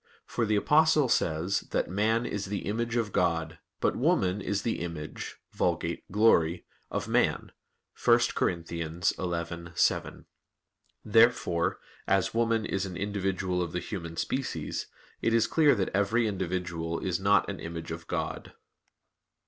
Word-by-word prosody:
For 115 Hz, -2 st, -1 dB
the 105 Hz, -, +2 dB
Apostle 150 Hz, +5 st, +4 dB
says 85 Hz, 0 st, +1 dB
that -, -, 0 dB
"man 110 Hz, +6 st, +1 dB
is 105 Hz, -4 st, -3 dB
the 100 Hz, 0 st, -4 dB
image 115 Hz, +3 st, -1 dB
of 115 Hz, -4 st, 0 dB
God, 80 Hz, -2 st, 0 dB, 0.2 s
but -, -, +1 dB
woman 95 Hz, +2 st, +1 dB
is 100 Hz, +1 st, -2 dB
the 115 Hz, -, -1 dB
image 85 Hz, -3 st, -6 dB, 0.2 s
[Vulg. -, -, 0 dB
glory] 90 Hz, -5 st, +3 dB, 0.2 s
of -, -, -3 dB
man" -, -, +1 dB, 0.5 s
(1 -, -, +6 dB
Cor. -, -, +2 dB
11:7). 85 Hz, 0 st, -2 dB, 0.8 s
Therefore, 110 Hz, -6 st, +3 dB, 0.3 s
as 95 Hz, -1 st, +2 dB
woman 115 Hz, -1 st, +1 dB
is 95 Hz, -1 st, -1 dB
an 90 Hz, -2 st, -7 dB
individual 95 Hz, -2 st, -1 dB
of 85 Hz, -2 st, -3 dB
the 90 Hz, -, -1 dB
human 85 Hz, -5 st, -6 dB
species, 135 Hz, 0 st, -3 dB, 0.3 s
it 115 Hz, -, +2 dB
is 115 Hz, -, +4 dB
clear 150 Hz, -4 st, +4 dB
that 95 Hz, -4 st, 0 dB
every 100 Hz, +4 st, +2 dB
individual 90 Hz, -4 st, -2 dB
is 90 Hz, -1 st, -1 dB
not 100 Hz, +2 st, +3 dB
an 100 Hz, -2 st, -5 dB
image 80 Hz, 0 st, -6 dB
of 80 Hz, 0 st, -7 dB
God. -, -, -4 dB
95 Hz, 140 wpm, -29 LUFS, 85-110 Hz, 0.8 s, 1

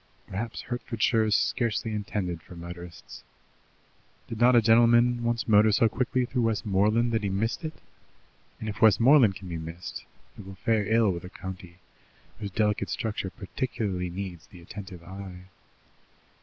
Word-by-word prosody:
Perhaps 110 Hz, +3 st, -5 dB
Hertfordshire 115 Hz, -2 st, 0 dB
is 105 Hz, -1 st, +2 dB
scarcely 115 Hz, -2 st, 0 dB
intended 100 Hz, -5 st, -3 dB
for 90 Hz, -, -13 dB
motorists. 85 Hz, 0 st, -10 dB, 1.1 s
Did 115 Hz, -, -6 dB
not 125 Hz, +1 st, +6 dB
a -, -, +8 dB
gentleman 120 Hz, +2 st, +5 dB
once 115 Hz, -1 st, -1 dB
motor 110 Hz, 0 st, +5 dB
so 115 Hz, +3 st, +4 dB
quickly 125 Hz, +2 st, 0 dB
through 125 Hz, 0 st, -1 dB
Westmoreland 110 Hz, +1 st, +2 dB
that 115 Hz, -1 st, +1 dB
he 100 Hz, -, -1 dB
missed 110 Hz, -, -1 dB
it? 155 Hz, 0 st, -4 dB, 0.8 s
and 110 Hz, -, -6 dB
if 105 Hz, -1 st, -5 dB
Westmoreland 115 Hz, 0 st, +6 dB
can 95 Hz, -, -9 dB
be 85 Hz, -2 st, -4 dB
missed, 80 Hz, +2 st, -7 dB, 0.4 s
it 100 Hz, -, -10 dB
will 95 Hz, -, -9 dB
fare 105 Hz, +1 st, 0 dB
ill 110 Hz, -3 st, +4 dB
with 85 Hz, -1 st, -5 dB
a 90 Hz, -, -8 dB
county 90 Hz, -2 st, -9 dB, 0.6 s
whose 105 Hz, -2 st, -4 dB
delicate 105 Hz, +1 st, 0 dB
structure 105 Hz, -3 st, -3 dB
particularly 95 Hz, -2 st, -3 dB
needs 90 Hz, -2 st, -7 dB
the 90 Hz, -, -14 dB
attentive 90 Hz, 0 st, -9 dB
eye. 95 Hz, 0 st, -9 dB
105 Hz, 155 wpm, -27 LUFS, 95-115 Hz, 1.1 s, a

